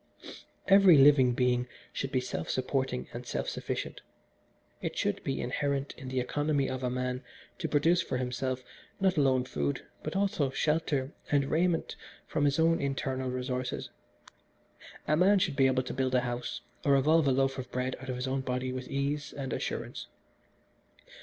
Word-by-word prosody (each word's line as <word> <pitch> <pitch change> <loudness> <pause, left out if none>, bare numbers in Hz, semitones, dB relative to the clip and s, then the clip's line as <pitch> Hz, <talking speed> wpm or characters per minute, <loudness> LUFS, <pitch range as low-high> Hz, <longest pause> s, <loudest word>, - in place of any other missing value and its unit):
"Every 195 -4 +8
living 135 -3 +6
being 125 0 +1 0.3
should 135 - -3
be 130 - +1
self 125 - -4
supporting 130 - -1
and - - -5
self - - -3
sufficient. - - -4 0.8
It - - -4
should - - -1
be 135 - -2
inherent 140 +2 -1
in 130 - -9
the 130 0 -1
economy 145 +2 0
of 130 0 -3
a 125 - 0
man 125 +1 -2 0.4
to 160 -4 -2
produce 165 +4 +3
for 130 - -2
himself 130 +1 -2 0.4
not 190 -1 +3
alone 135 -4 +3
food 70 - -2 0.2
but - - -5
also 190 -8 +1
shelter 145 -1 0 0.2
and 140 -1 +2
raiment 170 +1 +1 0.3
from 150 -2 0
his 140 -1 +2
own 165 +1 +3
internal 135 -2 -2
resources. 125 0 -3 1.2
A 150 - +3
man 190 +5 +5
should 180 -7 +1
be 135 -1 +5
able 130 0 +2
to 125 - -5
build 130 -1 0
a 125 - +4
house 120 0 -4 0.2
or 140 -1 +4
evolve 155 +3 +4
a - - +4
loaf 135 0 +1
of 125 -1 -6
bread 125 +1 -1
out 130 - -8
of 130 - -1
his 125 +1 -3
own 135 +1 0
body 130 0 -2
with 130 0 -5
ease 140 +2 -2
and 135 -4 -4
assurance. - - -4
135 Hz, 170 wpm, -30 LUFS, 125-145 Hz, 1.2 s, Every